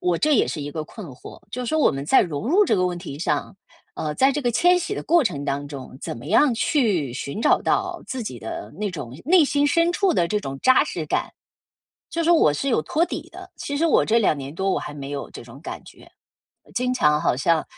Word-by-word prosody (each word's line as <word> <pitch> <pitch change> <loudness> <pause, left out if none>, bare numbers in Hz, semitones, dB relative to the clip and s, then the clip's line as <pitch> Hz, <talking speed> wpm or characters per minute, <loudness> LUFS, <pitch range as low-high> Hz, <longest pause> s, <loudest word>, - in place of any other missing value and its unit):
我 180 -1 +1
这 305 -1 +3
也 - - +3
是 155 - -4
一 145 - -5
个 155 - -3
困 200 +1 -10
惑， 130 - -12
就 250 - -4
是 - - -5
说 315 - +1
我 - - +4
们 135 0 -4
在 265 - +5
融 170 - -4
入 400 +6 +5
这 - - +2
个 180 - +2
问 175 -1 -3
题 155 -6 -8
上， 175 - -2 0.4
呃， 150 -1 -3
在 270 +1 +3
这 295 - -2
个 245 - +1
迁 355 +10 +4
徙 410 - -3
的 - - -5
过 340 0 +4
程 145 -10 -2
当 145 +1 -3
中， 135 -2 -9
怎 - - -5
么 115 - -11
样 290 -5 +4
去 210 - +1
寻 140 +6 -5
找 - - +4
到 365 -2 -1
自 260 -2 -4
己 130 - -6
的 110 -1 -7
那 210 -2 -2
种 125 -9 -7
内 355 -1 +6
心 285 0 +1
深 335 +4 +2
处 380 -2 +1
的 170 - +2
这 210 -1 0
种 135 -6 -6
扎 260 0 +5
实 165 - -4
感？ - - -1 0.8
就 335 - -1
是 330 - 0
说 345 - +7
我 155 - +4
是 210 - -2
有 230 - +2
托 310 - +1
底 - - -6
的， - - -12
其 285 - -4
实 325 +3 +2
我 325 - +4
这 230 +2 +3
2 200 -8 +2
年 140 +1 -7
多 195 +3 -1
我 - - 0
还 - - -7
没 140 -1 -7
有 145 -1 -5
这 - - -10
种 125 +4 -13
感 - - -7
觉， - - -16 0.6
经 250 0 0
常 150 -10 +3
好 - - +1
像 160 +4 +2
200 Hz, 275 characters per minute, -23 LUFS, -, 0.8 s, 说